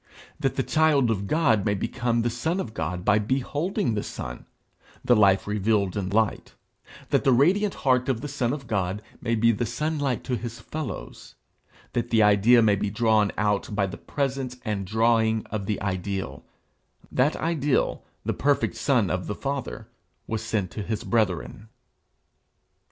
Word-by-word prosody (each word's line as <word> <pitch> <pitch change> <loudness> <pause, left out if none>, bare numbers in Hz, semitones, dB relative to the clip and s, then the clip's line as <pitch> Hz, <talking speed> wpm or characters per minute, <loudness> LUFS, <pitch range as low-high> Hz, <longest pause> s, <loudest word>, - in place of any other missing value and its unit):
That - - 0
the - - 0
child 150 -6 +3
of 100 -2 -2
God 115 -10 +2
may 105 -2 +1
become 120 +3 -1
the 120 - 0
son 160 +10 -1
of 115 - -4
God 90 0 -3
by 105 - +4
beholding 140 - -1
the 105 - -1
Son, - - -7 0.6
the 120 - +5
life 100 -3 +4
revealed 105 -2 0
in 100 -3 -2
light; 110 +1 0 0.6
that - - +3
the 135 - +4
radiant 185 - +3
heart 125 -1 +3
of 125 -4 0
the 145 - -4
Son 130 -4 -1
of 140 -2 -5
God 100 -2 -2 0.2
may 115 -1 0
be 115 +1 +4
the 115 +1 -1
sunlight 145 +1 -1
to 125 - -1
his 120 -1 -6
fellows; 150 - -7 0.6
that 120 0 -1
the 115 -2 +4
idea 105 +4 +5
may 105 -2 +4
be 100 +1 -2
drawn 110 -1 +2
out 105 0 0
by 100 -1 +2
the 95 - -6
presence 135 -3 -3
and 100 -3 -2
drawing 110 +1 +2
of 100 -2 -3
the 105 - -1
Ideal 95 -6 -3 0.7
that 135 +4 +2
Ideal, 150 -4 0 0.2
the - - 0
perfect 135 -6 +1
Son 115 -5 +2
of 90 0 -2
the 105 - -3
Father, 140 +1 -4 0.4
was 110 -1 -3
sent 105 -5 -2
to 105 - -5
his 105 +1 -3
brethren. 100 - -1
110 Hz, 170 wpm, -25 LUFS, 100-130 Hz, 0.7 s, the